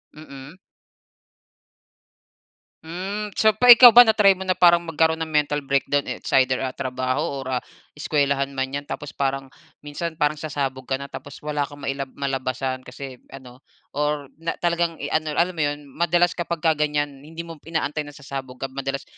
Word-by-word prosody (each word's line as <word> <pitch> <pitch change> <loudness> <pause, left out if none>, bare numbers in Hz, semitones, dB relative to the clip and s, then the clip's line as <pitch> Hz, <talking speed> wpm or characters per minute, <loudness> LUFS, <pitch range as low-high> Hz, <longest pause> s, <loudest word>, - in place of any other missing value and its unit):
Mm. 145 +2 -12 2.3
Hmm, 190 +6 -4
so 220 - +4
pa 250 - +4
ikaw 245 0 +10
ba 240 +1 +9
na-try 210 -3 +5
mo 190 - -6
na 185 - +2
parang 175 -1 +6
magkaroon 160 0 +1
ng 160 - -3
mental 150 -1 +1
breakdown 140 +1 +1
it's - - -6
either, 130 0 +1
ah, 130 - -2
trabaho 130 +2 -3
or 130 -1 -2
ah, - - -24 0.3
eskuwelahan 140 -2 0
man 130 0 -2
yan 145 0 -5
tapos 145 - -6
parang 135 -1 -2 0.3
minsan 160 +3 -5
parang 150 -1 0
sasabog 135 -4 -4
ka 135 - 0
na 140 +1 -8
tapos 145 - -10
wala 150 -1 -2
kang 145 -1 -13
mailab 135 0 -3
malabasan 130 -1 -2
kasi 130 0 -9 0.2
ano, 125 -1 -13 0.3
or 150 -1 -2
na 165 0 -3
talagang, 170 -1 +1
eh, 145 -1 -6
ano 155 -1 -1
alam 175 +2 +2
mo 170 - -10
iyon 145 -1 0
madalas 175 +3 +2
kapagka 170 -2 -1
ganyan 145 -2 -1
hindi 165 +4 -9
mo 165 -2 -10
inaantay 155 -2 -3
na 145 - -12
sasabog 135 -2 -7
ka 135 +1 -6
madalas 135 0 -4
145 Hz, 170 wpm, -23 LUFS, 135-165 Hz, 2.3 s, ikaw